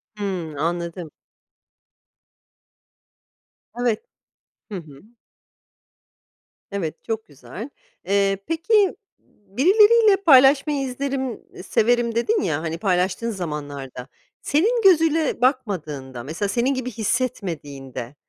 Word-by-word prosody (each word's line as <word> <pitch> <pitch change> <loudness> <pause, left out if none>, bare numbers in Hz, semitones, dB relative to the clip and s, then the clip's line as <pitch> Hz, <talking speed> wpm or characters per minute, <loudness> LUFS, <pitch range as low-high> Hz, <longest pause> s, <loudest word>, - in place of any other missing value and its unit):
Hımm 185 -7 -4
anladım. 170 0 -3 2.6
Evet. 245 - 0 0.7
Hı - - -4
hı. 150 -5 -12 1.7
Evet, 175 -6 -4
çok 225 -1 -3
güzel. 145 - -9 0.4
Eee, 195 0 +2
peki, 390 +5 +2 0.5
birileriyle 415 - +5
paylaşmayı 285 -4 +5
izlerim, 265 -1 -3 0.2
severim, 235 +1 +1
dedin 420 - +1
ya, 155 -3 -1
hani, 165 0 -3
paylaştığın 185 +4 0
zamanlarda, 145 - -6 0.3
senin 440 - +1
gözüyle 325 - +3
bakmadığında, 155 - -1
mesela 165 - -3
senin 250 +5 +1
gibi 255 -1 -4
hissetmediğinde, 150 - -4
210 Hz, 85 wpm, -22 LUFS, -, 2.6 s, birileriyle